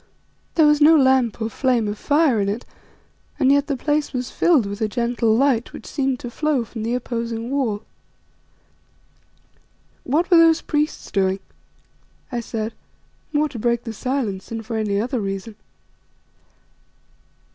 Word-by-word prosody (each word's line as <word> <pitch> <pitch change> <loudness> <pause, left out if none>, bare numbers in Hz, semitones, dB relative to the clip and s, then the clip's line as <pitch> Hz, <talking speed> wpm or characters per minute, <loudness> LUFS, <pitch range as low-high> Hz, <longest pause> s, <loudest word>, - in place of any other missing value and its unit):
There 320 - +5
was 300 0 +4
no 315 +2 +7
lamp 260 -5 +3
or - - 0
flame 245 -4 +1
of 205 - -2
fire 285 -2 +2
in 200 - 0
it, 215 +4 -4 0.7
and 270 -2 +4
yet 285 0 +3
the 280 - -1
place 295 +3 -1
was 250 -1 -3
filled 315 -10 +3
with 200 +1 -6
a 220 - +2
gentle 235 0 +1
light 260 -3 +1
which - - -10
seemed 270 -3 -1
to 240 - -6
flow 295 -3 0
from 225 0 -8
the 230 +3 -1
opposing 235 -1 -4
wall. 235 -7 -1 2.2
"What 325 +8 0
were 345 - +8
those 330 -1 +5
priests 300 0 -2
doing?" 190 0 +1 0.9
I 240 - -2
said, 225 -1 -4 0.6
more 300 0 +2
to 240 - -7
break 235 +1 0
the 225 - -6
silence 225 -5 -3
than 225 -1 -5
for 225 +1 -5
any 210 -2 0
other 245 +3 -1
reason. 195 +1 -4
245 Hz, 155 wpm, -22 LUFS, 220-285 Hz, 2.2 s, were